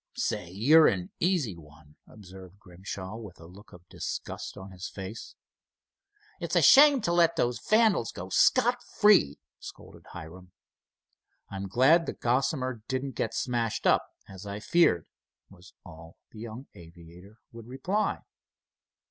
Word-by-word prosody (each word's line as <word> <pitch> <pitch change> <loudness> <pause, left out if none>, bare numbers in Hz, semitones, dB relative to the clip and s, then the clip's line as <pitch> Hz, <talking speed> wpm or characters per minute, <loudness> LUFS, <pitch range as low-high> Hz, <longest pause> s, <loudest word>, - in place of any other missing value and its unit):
"Say, 85 - -3
you're 140 - +5
an 90 -2 -2
easy 165 - 0
one," 75 -2 -18
observed 95 -2 -14
Grimshaw, 95 +2 -9
with 105 -7 -11
a 80 - -13
look 95 +5 -16
of 90 0 -16
disgust - - -7
on 95 +1 -10
his 90 0 -8
face. 95 +3 -9 1.0
"It's - - -4
a - - +4
shame 285 -1 +7
to 170 - -1
let 170 -1 +3
those 120 0 -1
vandals 215 - +2
go 90 +1 -9
scot 245 - +3 0.2
free," 205 - +4 0.2
scolded - - -13
Hiram. 90 +3 -11 1.0
"I'm 100 0 -5
glad 140 - +3
the - - -3
Gossamer 130 -1 -1
didn't 130 +1 -3
get 115 0 -3
smashed 115 -1 -2
up, - - +4 0.2
as 95 0 -11
I 100 +1 -6
feared," 115 - +2 0.5
was 95 0 -18
all 80 -1 -14
the 110 - -13
young 115 +3 -8
aviator 85 +3 -15
would 115 -1 -12
reply. 180 - -2
105 Hz, 140 wpm, -27 LUFS, 90-135 Hz, 1.0 s, shame